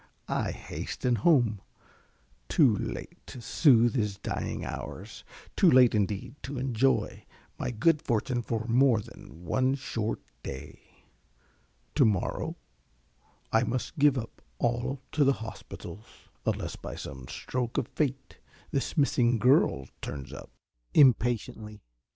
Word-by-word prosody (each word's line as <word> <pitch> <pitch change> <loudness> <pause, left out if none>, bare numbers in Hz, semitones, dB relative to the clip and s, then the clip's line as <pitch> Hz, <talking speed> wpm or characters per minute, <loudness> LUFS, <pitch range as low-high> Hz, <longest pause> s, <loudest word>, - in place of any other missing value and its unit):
I - - -1
hasten 125 -2 -3
home 115 - +3 0.9
too - - +5
late - - -5
to 125 - -9
soothe 120 -2 +4
his 105 -6 -1
dying - - -4
hours; - - -7 0.3
too - - +5
late 125 -2 +6
indeed 100 -2 -1
to 135 +1 -6
enjoy 130 0 +1 0.4
my - - -2
good 150 +7 +2
fortune 120 +1 0
for 115 -1 -3
more 120 0 +4
than 90 -4 -12
one 130 +8 +2
short 115 -5 -3 0.2
day. 70 +2 -10 0.9
To 145 - +4
morrow 105 -5 0 1.0
I 110 - +5
must 125 +5 -3
give 145 -1 +5
up 115 -2 -6 0.2
all 125 +3 -1
to 150 - +3
the 140 0 +4
hospitals, 110 -4 -9 0.4
unless - - -1
by - - -7
some 65 -2 -8
stroke 125 -2 -3
of - - 0
Fate 135 -3 -3 0.3
this 140 +2 -2
missing 125 -4 +3
girl 115 - +3
turns 70 -2 -6
up. - - -9 0.5
(_Impatiently. 115 -5 +3
120 Hz, 125 wpm, -29 LUFS, 110-135 Hz, 1.0 s, late